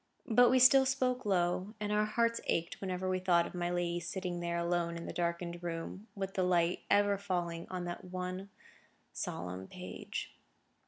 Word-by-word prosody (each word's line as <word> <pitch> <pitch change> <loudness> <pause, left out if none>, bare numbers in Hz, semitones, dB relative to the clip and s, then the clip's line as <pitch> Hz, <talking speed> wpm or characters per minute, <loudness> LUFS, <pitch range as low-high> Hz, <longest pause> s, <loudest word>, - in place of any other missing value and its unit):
But 245 -1 +6
we 260 - +5
still 265 +1 +7
spoke 255 -1 0
low, 185 +2 +1
and 210 0 -2
our 210 0 +3
hearts 230 +1 +1
ached 170 +1 -1
whenever 185 -1 -2
we 185 0 +1
thought 175 -2 +3
of - - -8
my 175 -1 -1
lady 175 -1 0
sitting 175 +1 -4
there 170 0 -1
alone 170 0 0
in 170 - -6
the - - -5
darkened 170 0 -2
room, 175 +4 -5
with 195 -1 -3
the 190 - 0
light 175 -1 +2
ever 205 -1 +4
falling 175 -4 -2
on 180 -1 -3
that 175 +1 -5
one 185 +1 -5 0.6
solemn 90 +2 -4
page. 180 0 -6
180 Hz, 175 wpm, -33 LUFS, 170-200 Hz, 0.6 s, still